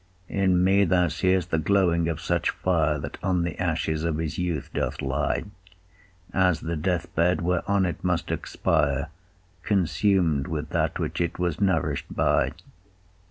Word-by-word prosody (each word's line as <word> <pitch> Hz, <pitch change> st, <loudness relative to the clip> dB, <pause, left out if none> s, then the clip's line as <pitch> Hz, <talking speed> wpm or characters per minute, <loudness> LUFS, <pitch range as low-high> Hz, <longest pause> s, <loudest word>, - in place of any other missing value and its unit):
In 95 Hz, -2 st, +2 dB
me 100 Hz, +2 st, +4 dB
thou 90 Hz, -1 st, +3 dB
see'st 90 Hz, +3 st, 0 dB
the 80 Hz, -, +2 dB
glowing 85 Hz, -2 st, +2 dB
of 80 Hz, -, -3 dB
such -, -, 0 dB
fire, 80 Hz, -4 st, +1 dB
That 70 Hz, 0 st, -7 dB
on 90 Hz, -2 st, +1 dB
the 85 Hz, -, -3 dB
ashes 80 Hz, -2 st, -1 dB
of 85 Hz, -2 st, 0 dB
his 80 Hz, 0 st, -3 dB
youth 90 Hz, -3 st, -2 dB
doth -, -, -2 dB
lie, -, -, -1 dB, 0.9 s
As 90 Hz, -4 st, +2 dB
the 85 Hz, +1 st, -3 dB
death 85 Hz, +3 st, -2 dB
bed, 90 Hz, +2 st, +2 dB
whereon 90 Hz, +3 st, +1 dB
it 85 Hz, -, -4 dB
must 90 Hz, -2 st, 0 dB
expire, 70 Hz, +2 st, 0 dB, 0.5 s
Consum'd 90 Hz, -5 st, +1 dB
with 75 Hz, -1 st, -4 dB
that -, -, 0 dB
which -, -, -3 dB
it 85 Hz, -, -1 dB
was 85 Hz, -2 st, -2 dB
nourish'd 80 Hz, -7 st, +1 dB
by. -, -, +1 dB
85 Hz, 155 wpm, -25 LUFS, 80-95 Hz, 0.9 s, me